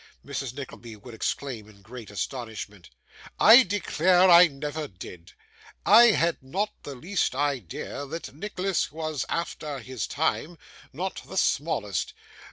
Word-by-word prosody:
Mrs. 135 -3 -5
Nickleby 120 -5 -9
would 115 +3 -13
exclaim 115 -1 -4
in 100 -2 -19
great 115 +1 -10
astonishment; 105 -3 -6 0.5
'I 230 +5 +9
declare 185 -3 +3
I 175 +1 +9
never 150 +1 -5
did! 90 -2 -12 0.5
I 225 +4 +8
had 170 -9 +2
not 185 +11 -2
the 140 - -8
least 175 +1 -1
idea 140 - -3
that 165 +1 -7
Nicholas 190 +3 -2
was 155 -3 -3
after 155 -3 -3
his 130 -1 -5
time, 160 +2 -2 0.3
not 185 +7 -4
the 190 - -7
smallest. 110 - -1
145 Hz, 130 wpm, -26 LUFS, 120-175 Hz, 0.5 s, I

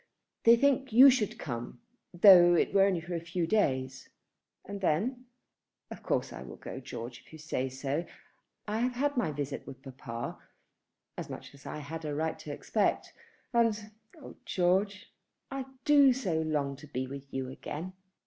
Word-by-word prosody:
"They 230 0 +9
think 270 +1 +2
you 260 +5 +9
should 230 -5 -1
come, 120 -5 -6 0.3
though 175 -1 +8
it - - +1
were 195 -1 +6
only 185 -4 0
for 175 +2 -7
a 170 - -1
few 170 +1 -2
days." 130 -9 0 0.6
"And 200 0 -7
then? 230 - 0 0.7
Of - - -8
course - - -1
I - - -8
will 65 - -9
go, - - -8
George, 115 0 -8
if - - -22
you 160 - -10
say 145 -4 -3
so. 140 +5 -3 0.6
I 210 +1 -1
have 250 +1 0
had 285 +3 0
my 205 -11 0
visit 145 -1 -5
with 130 0 -10
papa, 125 -3 -7 0.8
as - - -6
much - - -9
as 140 - -14
I - - -5
had 160 +2 -7
a 150 -1 -3
right 160 +1 -2
to - - -7
expect. - - -1 0.4
And, 220 -3 +1 0.3
oh 285 - -12
George, 190 +3 0 0.4
I 270 -1 -4 0.2
do 285 -3 +6
so 185 -11 -1
long 145 -3 -1
to 150 +2 -12
be 130 -2 -3
with 140 +1 -9
you 130 -1 -3
again." 160 +7 -6
170 Hz, 175 wpm, -30 LUFS, 140-215 Hz, 0.8 s, They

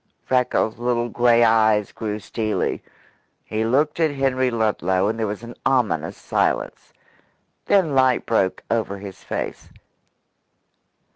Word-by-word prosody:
Freckles' 125 -3 +1
little 120 0 0
grey 120 0 +4
eyes 110 -2 +3
grew 105 -2 -4
steely. 110 +1 -2 0.6
He 110 +1 -2
looked 145 +7 +1
at 160 -1 +3
Henry 135 -2 0
Ludlow, 100 -5 0
and 115 +2 -2
there 110 - 0
was 105 +2 -5
an 120 0 -8
ominous 125 -7 0
silence. - - -2 0.8
Then 185 -7 +3
light 130 -1 +3
broke 95 -5 0
over 110 -3 -1
his 100 -1 -10
face. - - -5
115 Hz, 125 wpm, -22 LUFS, 110-130 Hz, 0.8 s, grey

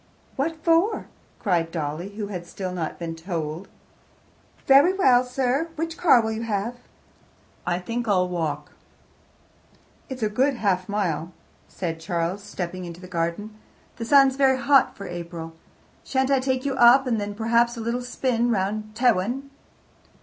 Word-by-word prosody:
"What 315 +5 -1
for?" 340 +6 +2 0.3
cried 170 -4 0
Dolly, 165 +4 -4
who 210 -1 -3
had 180 -4 -6
still 185 +1 -5
not 165 -3 -4
been 165 -1 -5
"told." 165 0 -4 1.0
"Very 280 +7 +6
well, 255 -10 +4
sir. 260 +5 -1
Which 330 +1 -3
car 265 -10 +5
will 220 - -1
you 220 +1 -3
have?" 225 0 -2 0.9
"I 175 -1 +1
think 230 +6 -4
I'll 185 -3 +3
walk." 160 -5 -3 1.4
"It's 260 -3 -5
a - - +3
good 265 +6 +1
half 190 -5 0
mile," 175 -5 -2 0.3
said 165 -3 -4
Charles, 170 +3 -2
stepping 185 -3 -5
into 170 0 -8
the 185 - -10
garden. 180 +5 -3 0.4
"The 230 - -4
sun's 270 0 +5
very 265 -1 +4
hot 275 0 +3
for 200 - -7
April. 170 -2 -7 0.5
Shan't 265 0 0
I 270 - +4
take 260 0 -1
you 275 - 0
up, 260 +1 +6
and 230 -4 0
then, 205 0 -4
perhaps, 235 +2 +2
a - - -4
little 235 +2 -2
spin 245 -1 0
round 215 +1 -2
by - - -10
Tewin?" 245 +4 +1
215 Hz, 155 wpm, -24 LUFS, 180-260 Hz, 1.4 s, Very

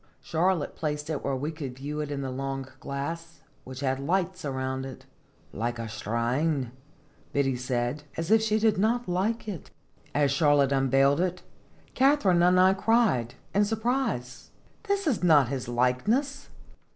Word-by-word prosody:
Charlotte 170 -1 0
placed 150 0 -3
it 150 - -3
where 140 - -1
we 145 +5 -3
could 140 -6 -6
view 145 +3 -5
it 150 -1 -3
in 140 -1 -3
the 130 - -3
long 135 0 -4
glass, 165 +5 -5 0.2
which 130 +1 -8
had 135 -1 0
lights 185 +5 -1
around 130 -1 -3
it, 135 -1 -9 0.3
" - - -33
like 120 0 -1
a 115 -1 -4
shrine," 120 +5 -1 0.6
Biddy 135 -2 +1
said, 125 +2 -2 0.2
as 165 +4 -2
if 220 0 +6
she 215 -1 +1
did 220 -3 +2
not 235 +4 +1
like 200 +6 -1
it. 190 -7 -6 0.5
As 145 -2 +3
Charlotte 145 -2 +3
unveiled 135 +1 +3
it, 180 0 -2 0.5
Katharine 260 -10 +4
and 180 +1 +5
I 185 +1 +6
cried, 195 - +2 0.2
in 205 - +4
surprise: 220 - -2 0.2
" - - -34
This 400 -1 0
is 260 - 0
not 150 -8 +5
his 130 -3 -3
likeness 205 - 0
150 Hz, 165 wpm, -27 LUFS, 130-190 Hz, 0.6 s, if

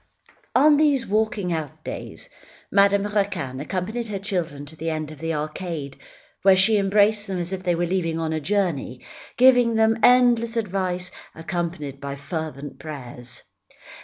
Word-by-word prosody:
On 295 +3 +6
these 285 -5 +3
walking 215 -3 0
out 155 -4 -5
days, - - -7 0.4
Madame 200 0 +4
Raquin 195 -11 -2
accompanied 190 - -3
her 205 -2 -3
children 175 -8 -3
to 155 +2 -9
the 160 +1 -3
end 155 -1 -3
of 155 - -11
the 165 +2 -2
arcade, 155 -2 -4 0.5
where 195 0 +6
she 200 +4 +4
embraced 205 +2 +3
them 190 -1 -3
as 175 +1 -3
if 190 - -4
they 175 -2 +1
were 175 +1 0
leaving 165 -2 -1
on 160 -1 -1
a 160 - -1
journey, 165 -8 -1 0.3
giving 245 -2 +5
them 225 +1 +3
endless 240 -2 +4
advice, 185 -4 -2 0.2
accompanied 165 -4 -4
by 140 0 -4
fervent 145 -1 -6
prayers. 125 -5 -8
180 Hz, 155 wpm, -23 LUFS, 155-210 Hz, 0.5 s, On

